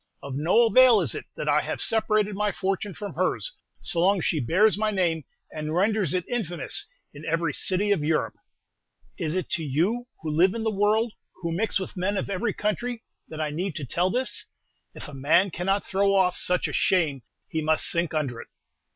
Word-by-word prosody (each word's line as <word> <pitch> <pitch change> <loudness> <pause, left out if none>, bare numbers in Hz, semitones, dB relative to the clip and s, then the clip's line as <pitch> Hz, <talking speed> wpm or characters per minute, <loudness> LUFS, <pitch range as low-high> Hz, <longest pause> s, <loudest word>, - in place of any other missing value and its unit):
Of 140 - -6
no 170 +11 +4
avail 240 0 +6
is 145 - 0
it - - -6
that - - -5
I - - +4
have - - -4
separated 215 -2 +1
my 210 +1 0
fortune 195 0 -2
from 200 -1 -6
hers, 185 - -1 0.3
so 170 - -2
long 195 +4 +4
as - - -3
she 160 - +1
bears 185 - +3
my 215 +1 0
name, 170 -6 0 0.3
and 155 +1 -3
renders 200 -3 +1
it 180 - -2
infamous 225 - -3 0.3
in 145 +1 -11
every 165 -1 0
city 195 +6 0
of 170 -7 +2
Europe. 155 +1 0 0.9
Is 155 +2 -1
it 185 - -1
to 170 -5 0
you, 180 - 0 0.2
who 155 - -2
live 180 +6 +3
in 230 - -3
the 220 - +1
world, 215 +3 +2 0.3
who 170 - -1
mix 200 +5 0
with 190 - -6
men 195 +2 -1
of 195 - -3
every 210 +3 0
country, 225 +4 -2 0.2
that 155 - -8
I 155 -1 -1
need 175 +3 -3 0.2
tell 180 +2 +2
this? 255 +6 -1 0.5
If - - -8
a 145 - -10
man 165 +8 +3
cannot 195 +5 0
throw 195 0 +2
off 180 -2 +3
such 180 0 0
a - - -6
shame, 160 -8 +2 0.3
he 160 - -2
must 155 0 +1
sink 170 -2 -1
under 135 -6 -2
it." - - -13
185 Hz, 205 wpm, -26 LUFS, 160-210 Hz, 0.9 s, avail